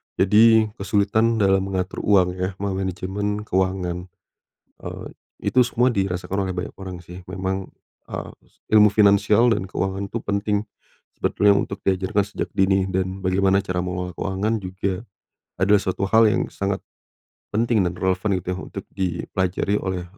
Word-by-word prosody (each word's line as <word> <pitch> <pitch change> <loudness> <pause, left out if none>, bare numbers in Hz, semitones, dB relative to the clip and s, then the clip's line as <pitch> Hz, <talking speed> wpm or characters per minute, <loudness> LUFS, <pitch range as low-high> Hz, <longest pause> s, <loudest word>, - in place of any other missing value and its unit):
jadi 110 +2 +5
kesulitan 105 +3 +2
dalam 95 -3 +3
mengatur 95 -1 -3
uang 90 -3 +2
ya 95 +1 -2
memanajemen 95 +2 -3
keuangan, 95 -2 -1 0.7
eee, - - -7 0.5
itu 130 - +6
semua 120 +1 +2
dirasakan 95 0 -1
oleh 90 - -4
banyak 90 +4 -4
orang 95 -1 -6
sih. 90 +2 -10
Memang, 95 0 -3 0.4
eee, - - -5 0.4
ilmu 105 -1 +7
finansial 105 +3 +4
dan 95 -3 -3
keuangan 95 +1 -2
itu 115 - -3
penting 100 +1 0 0.5
sebetulnya 100 0 +3
untuk 100 0 -2
diajarkan 95 +2 +1
sejak - - -3
dini 95 0 +3
dan 95 +1 -2
bagaimana 95 +1 +2
cara 90 -1 -2
mengelola 90 0 -3
keuangan 100 +4 -1
juga 95 +1 -4 0.5
adalah 100 +2 +4
suatu 95 +1 -3
hal 110 0 +6
yang 105 - +1
sangat, 100 -1 -2 0.7
penting 110 -3 +1
dan 85 - -4
relevan 95 +2 0
gitu - - -25
ya 90 - -3
untuk - - -7
dipelajari 95 +2 -1
oleh 95 -2 -3
95 Hz, 145 wpm, -23 LUFS, 95-105 Hz, 0.7 s, ilmu